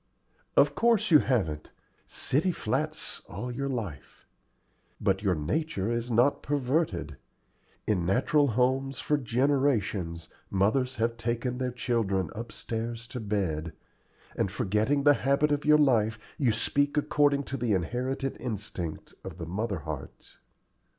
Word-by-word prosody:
"Of - - +5
course 230 -5 +2
you 155 - +9
haven't 80 - -1 0.4
city 160 +8 +1
flats 155 +4 -3
all 125 - -5
your 140 +3 -3
life. 100 - -6 0.7
But 95 0 +1
your 95 -4 +2
nature 100 - -1
is 120 +1 -2
not 120 +4 +3
perverted. 145 - -1 0.7
In 100 -5 +1
natural 140 - +3
homes 130 +3 +1
for 150 - +1
generations 115 - 0 0.2
mothers 125 +7 +1
have 115 0 0
taken 120 +2 -2
their 130 -1 0
children 115 -6 -1
upstairs 115 0 -5
to 125 - -5
bed, 90 -8 -2 0.6
and, - - 0
forgetting 110 +9 +1
the 145 0 +7
habit 140 +3 +2
of 145 0 0
your 150 0 +7
life, 115 -7 +3 0.2
you 130 -6 +3
speak 145 +6 0
according 145 -1 +3
to 135 - -5
the 115 -3 0
inherited 125 +9 -2
instinct 100 -8 -5
of - - -8
the 85 - -5
mother 100 +1 -3
heart." 75 -2 -8
120 Hz, 130 wpm, -28 LUFS, 100-140 Hz, 0.7 s, you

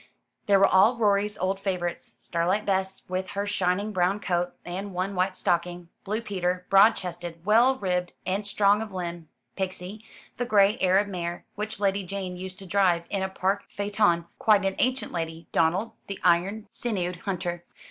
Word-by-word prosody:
There 200 -1 +6
were 195 - +6
all 210 +6 +5
Rorie's 205 -1 +2
old 190 +1 -1
favourites 180 -3 -3
Starlight 180 +5 0
Bess, 190 -1 -1
with 185 +1 -2
her 200 +1 -3
shining 200 +1 0
brown 185 +1 +1
coat, 180 -3 -1
and 190 +2 -5
one 185 +2 -1
white 185 0 0
stocking; 175 0 -1
Blue 215 +3 -2
Peter, 180 -4 -2
broad 205 +3 +7
chested, 175 -2 -7
well 235 +5 +5
ribbed, 180 -6 -1
and 200 +2 -1
strong 205 0 +3
of 220 -2 -6
limb; 175 -3 -5 0.3
Pixie, 190 +2 -5 0.3
the 245 - -1
gray 205 -2 +4
Arab 190 +2 +3
mare, 175 -3 -4
which 215 0 -5
Lady 200 -1 +1
Jane 185 -1 -5
used 185 +1 -7
to 195 - -11
drive 180 -2 +2
in 195 - -1
a 190 - -1
park 190 +1 -1
phaeton 205 -4 +1
quite 210 -3 +4
an 195 - +1
ancient 255 +1 0
lady; 165 -1 -4
Donald, 185 +8 +1 0.2
the 195 - -5
iron 185 +5 +2
sinewed 180 -7 -2
hunter. 175 -1 -4
190 Hz, 170 wpm, -26 LUFS, 180-205 Hz, 0.3 s, broad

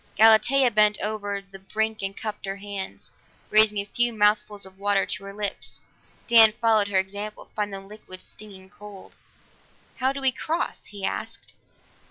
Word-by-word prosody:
Galatea 235 +4 +5
bent 210 0 +4
over 205 -1 -3
the 195 0 -14
brink 220 +3 -2
and 195 0 -4
cupped 210 -2 -6
her 195 - -3
hands, 200 -1 -7 0.4
raising 215 0 +5
a 200 - -1
few 240 +3 +1
mouthfuls 210 -1 +1
of 190 0 -15
water 200 -1 +1
to 190 - -4
her 200 - -8
lips; 205 -1 -3 0.5
Dan 225 -2 +7
followed 220 -2 +2
her 200 -2 0
example, 200 +3 -4
finding 205 -2 -3
the - - -16
liquid 205 -3 -12
stinging 195 -3 -13
cold. 205 -2 -13 0.8
"How 260 +1 +1
do 275 - -5
we 265 -1 +2
cross?" 320 +6 -3
he 200 -2 -6
asked. - - -5
210 Hz, 165 wpm, -25 LUFS, 195-220 Hz, 0.8 s, Dan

